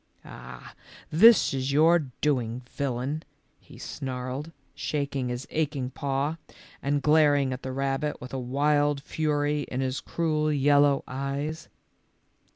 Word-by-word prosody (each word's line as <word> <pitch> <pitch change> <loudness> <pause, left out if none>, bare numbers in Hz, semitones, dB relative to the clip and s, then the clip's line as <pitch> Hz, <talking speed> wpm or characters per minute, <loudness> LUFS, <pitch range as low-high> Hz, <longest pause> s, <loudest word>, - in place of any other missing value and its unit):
" - - -28
Ah, 60 0 -11 0.4
this 220 +5 +6
is 135 0 -1
your 160 +1 +4
doing, 125 -4 0
villain," 140 +2 -2 0.4
he - - -16
snarled, 130 +4 -5 0.2
shaking 140 -3 -2
his 125 +2 -4
aching 145 -5 -1
paw 140 +4 -2 0.4
and 140 0 0
glaring 145 -3 +4
at 125 - -6
the 130 - -5
rab 135 +1 -1
bit 150 -1 -3
with 125 - -9
a 135 - -2
wild 145 +3 +1
fury 150 -1 0
in 130 - -3
his 130 0 -1
cruel, 155 -2 0
yellow 145 0 +4
eyes. 140 +4 -4
140 Hz, 135 wpm, -27 LUFS, 130-150 Hz, 0.4 s, this